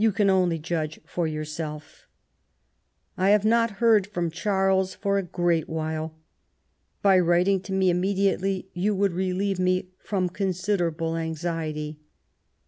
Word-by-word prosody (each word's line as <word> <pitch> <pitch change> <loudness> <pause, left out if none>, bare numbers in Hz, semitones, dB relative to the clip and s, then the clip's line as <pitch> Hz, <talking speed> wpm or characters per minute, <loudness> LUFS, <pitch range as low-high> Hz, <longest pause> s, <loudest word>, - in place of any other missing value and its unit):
can 200 -2 +3
only 180 -3 +2
jndge 160 -1 -3
for 175 -2 -2
yonrself. 155 0 -6 1.1
I 190 +1 +2
have 210 0 +4
not 230 -2 +2
hear4 220 -4 +4
from 175 -5 -2
Charles 190 0 +1
for 200 -1 0
a - - 0
great 175 -3 0
while. 160 0 -3 0.9
By 195 -2 +6
writmg 180 +2 +2
to 195 - -7
me 190 -1 +3
immediately 190 +1 0
yon 195 +3 0
wonld 195 -2 +2
relieve 190 +1 -1
me 185 0 +1
from 190 -3 -1
considerable 180 -3 -1
anxiety. 160 -2 -3
185 Hz, 130 wpm, -25 LUFS, 165-195 Hz, 1.1 s, By